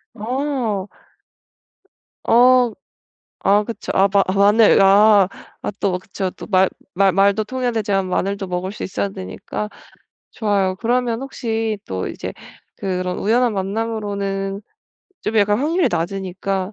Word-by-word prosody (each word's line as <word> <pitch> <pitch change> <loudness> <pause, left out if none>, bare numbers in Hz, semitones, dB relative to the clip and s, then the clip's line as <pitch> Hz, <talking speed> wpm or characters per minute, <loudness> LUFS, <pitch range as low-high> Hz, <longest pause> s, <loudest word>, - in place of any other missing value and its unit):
어. 235 -4 -2 1.4
어. 250 0 +5 0.8
아 205 +1 +5
그쵸. 230 +1 -5
아 195 +1 +5
마 200 -1 +4
마늘. 205 +1 +5
아. 200 0 +6 0.3
아 - - -3
또 185 -2 0
그쵸. 190 0 -4
또 - - -11
말 190 -2 +3 0.3
말 195 0 +4
말도 200 +3 +3
통해야 250 +2 -2
되지만 200 -4 0
마늘도 195 +1 -2
먹을 180 +2 -3
수 - - -7
있어야 195 +1 -2
되니까. 195 +2 -6 0.6
좋아요. 200 -4 0
그러면 240 +2 0
혹시 225 -5 -3
또 95 0 -4
이제 - - -6 0.4
그런 185 -1 -3
우연한 235 +2 +2
만남으로는 200 -1 -3 0.6
좀 220 +1 -2
약간 205 +1 +3
확률이 330 +6 +1
낮으니까 190 +2 -3
200 Hz, 245 characters per minute, -20 LUFS, 195-225 Hz, 1.4 s, 아